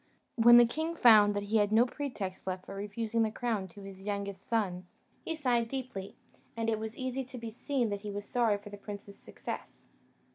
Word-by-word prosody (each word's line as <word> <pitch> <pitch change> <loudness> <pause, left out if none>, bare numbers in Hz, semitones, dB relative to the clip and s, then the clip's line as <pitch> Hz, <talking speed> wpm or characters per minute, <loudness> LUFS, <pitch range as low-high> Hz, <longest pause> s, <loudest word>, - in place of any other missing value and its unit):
When 240 0 +8
the 240 - +9
king 315 +7 -2
found 210 -7 +7
he 205 +2 0
had 205 -1 +2
no 225 +3 +6
pretext 230 -10 -5
left 185 0 -3
for - - -8
refusing 220 +3 -2
the 220 - +3
crown 220 -4 -2
to 195 +3 -13
his 195 -1 -10
youngest 200 -1 -4
son, 185 -6 -1 0.4
he 325 - -2
sighed 245 -6 +1
deeply, 255 -8 -5 0.4
and 225 0 0
it 220 - 0
was 220 0 -6
easy 260 +1 -2
to 255 0 -9
be 230 -1 -6
seen 245 +1 -1
that 205 -1 -3
he 210 - -6
was 205 0 -5
sorry 230 -4 +2
for 205 0 -12
the 205 - -8
prince's 200 0 -9
success. - - -8
220 Hz, 205 wpm, -31 LUFS, 200-240 Hz, 0.4 s, the